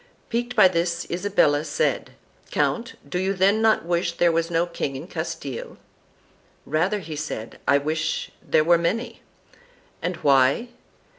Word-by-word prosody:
Piqued 240 +1 -2
by 210 -5 +8
this 170 -1 -1
Isabella 175 -5 +2
said 150 -2 -1 0.2
'" - - -31
Count 240 +1 -1
do 180 +5 -2
you 190 +1 0
then 195 +4 +3
not 220 -5 +3
wish 170 0 0
there 170 0 +3
was 165 0 0
no 170 0 +1
king 170 -5 -4
in 135 +5 -6
Castile?" 160 -7 -5 0.9
"Rather," 180 +7 0
said 145 -7 -5
he, - - -15
"I 140 - +5
wish 155 +2 -2
there 155 - +2
were 170 +1 +4
many." 185 +8 -2 0.8
"And 180 +2 -2
why?" 140 - +4
170 Hz, 150 wpm, -24 LUFS, 155-195 Hz, 0.9 s, by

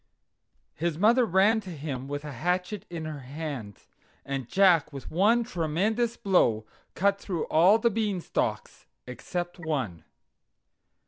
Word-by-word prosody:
His 165 -1 -2
mother 230 +6 +4
ran 200 +5 +4
to 195 - -10
him 140 -5 -5
with 145 +1 -5
a 150 - -6
hatchet 180 - -2
in 165 -2 -5
her 155 -2 -5
hand, 135 - -6 0.5
and 135 -3 -4
Jack 180 -6 +4
with 140 -2 -9
one 215 +8 +3
tremendous 215 +5 -1
blow 120 - +2 0.3
cut 200 +1 +2
through 175 -5 -3
all 180 +7 +6
the 235 +1 +2
Beanstalks 205 -5 -2 0.2
except 175 +9 -5
one. 135 - -3
170 Hz, 130 wpm, -27 LUFS, 145-200 Hz, 0.5 s, all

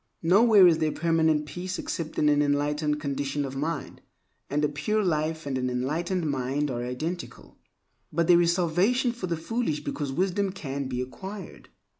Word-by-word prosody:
Nowhere 200 +3 +6
is 165 -3 +5
there 155 -1 +1
permanent 160 -2 +2
peace 180 +5 -5
except 160 -2 -4
in 150 - +3
an 145 0 +4
enlightened 150 +1 0
condition 140 0 -2
of 135 0 -6
mind; 155 +5 -4 0.5
and 150 +2 +1
a - - +3
pure 180 +10 -1
life 160 -2 -1
and 135 -2 -2
an 125 0 -1
enlightened 160 +8 -1
mind 140 +1 -1
are 120 -1 -3
identical. 155 +9 -6 0.5
But 170 +2 +1
there 175 0 +6
is 170 0 +3
salvation 190 +9 +2
for 230 -6 -5
the 170 -1 -1
foolish 170 -2 -2
because 145 -2 -3
wisdom 190 +5 0
can 140 -7 -4
be 125 -1 -3
acquired. 190 +9 -8
155 Hz, 170 wpm, -27 LUFS, 145-180 Hz, 0.5 s, Nowhere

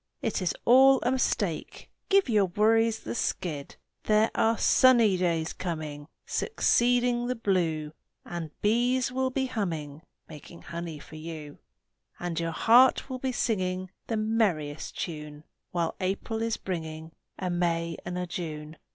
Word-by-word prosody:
It 225 -5 -1
is 180 - 0
all 265 +2 +7
a 245 - +2
mistake! 200 -10 -1 0.2
Give 395 -3 +4
your 210 -5 +3
worries 225 +4 +2
the - - -5
skid! 165 -10 -3 0.3
There 215 +1 +3
are 225 0 +2
sunny 235 -6 +5
days 170 -3 0
coming 155 -4 -5 0.2
Succeeding 245 - +2
the 250 - -1
blue 170 -8 0 0.3
And 170 -2 -5
bees 245 +4 +2
will 260 +1 0
be 265 +1 -1
humming 160 - -4 0.3
Making 160 +2 -12
honey 170 -2 -6
for 155 +2 -12
you, 155 -2 -8 0.6
And 175 -2 -3
your 165 0 -1
heart 245 - +4
will 255 - -4
be 260 0 -1
singing 185 -6 -1 0.2
The 225 - -1
merriest 200 -10 -1
tune 150 -3 -6 0.3
While 170 -2 -1
April 195 +4 -2
is 230 0 -1
bringing 160 -3 -5 0.3
A 185 -1 -2
May 170 -1 0
and 175 +1 -4
a 180 - -2
June! 155 -3 -6
185 Hz, 145 wpm, -28 LUFS, 160-230 Hz, 0.6 s, all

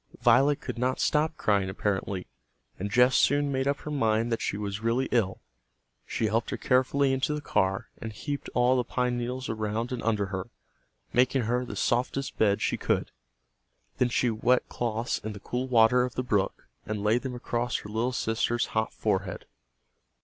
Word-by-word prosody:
Violet 135 +5 +5
could - - -5
not 130 +1 0
stop 155 +1 +1
crying, 100 -6 +1
apparently, 95 -1 -2 0.5
and 100 +2 -2
Jess 125 +4 +4
soon 145 0 +3
made 130 0 0
up 140 0 0
her 150 - -6
mind 115 -4 +1
that 115 - -1
she - - -1
was 100 0 -4
really 115 +3 +1
ill. 105 -6 +1 0.7
She - - -1
helped 110 +2 0
her - - -3
carefully 135 +2 +2
into 135 +3 0
the - - -3
car, 95 -8 0
and 115 - -5
heaped 140 +6 -5
all 125 +1 +4
the 125 - +2
pine 125 0 -1
needles 125 +2 -3
around 110 +2 -2
and 125 -2 -3
under 110 -3 +1
her, 95 +4 -4 0.6
making 125 +1 +3
her 120 +3 0
the 125 - -7
softest 130 +3 -1
bed 100 -2 +3
she - - 0
could. - - 0 0.9
Then 125 - +3
she 120 0 +1
wet 120 +3 +2
cloths 115 0 -2
in 110 0 -5
the 100 - -9
cool 125 +5 -3
water 120 0 +5
of 125 0 -2
the 125 - -1
brook 105 -5 -1 0.2
and 105 -1 -4
laid 110 +3 +3
them 130 -2 -4
across 120 0 -1
her 105 - -10
little 115 +4 0
sister's 115 0 0
hot 110 0 0
forehead. 100 -3 -1
120 Hz, 185 wpm, -28 LUFS, 110-125 Hz, 0.9 s, Violet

